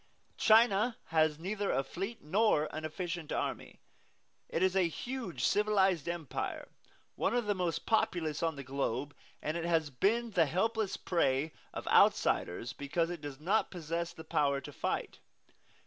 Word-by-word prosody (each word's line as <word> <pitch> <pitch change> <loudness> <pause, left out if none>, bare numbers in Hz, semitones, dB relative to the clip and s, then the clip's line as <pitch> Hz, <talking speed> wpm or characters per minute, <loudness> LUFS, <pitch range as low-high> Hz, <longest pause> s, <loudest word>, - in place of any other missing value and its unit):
China 225 0 +5
has 155 -2 +3
neither 200 +4 -2
a 135 - +1
fleet 195 - -5
nor 155 -2 +3
an 155 - -4
efficient 170 0 -4
army. - - -3 0.7
It 170 - 0
is 185 0 +2
a 185 -3 +4
huge 190 - -5
civilized 195 -6 +2
empire, 170 -5 -4 0.5
one 225 - 0
of 240 -2 +1
the 205 - +2
most 180 -4 -2
populous 170 -8 +1
on 165 -2 0
the 140 - -7
globe; 135 +1 -2 0.3
and 155 +2 -1
it 170 -1 -2
has 160 -3 +1
been 225 - +1
the 170 -6 +3
helpless 220 +6 0
prey 155 -3 +1 0.2
of - - -7
outsiders 115 +7 +3
because 165 +4 -1
it 175 -3 -6
does 145 -2 -7
not 195 +8 +1
possess 170 -1 -3
the 160 - -10
power 140 -3 +1
to - - -9
fight. - - -3
170 Hz, 155 wpm, -32 LUFS, 150-200 Hz, 0.7 s, China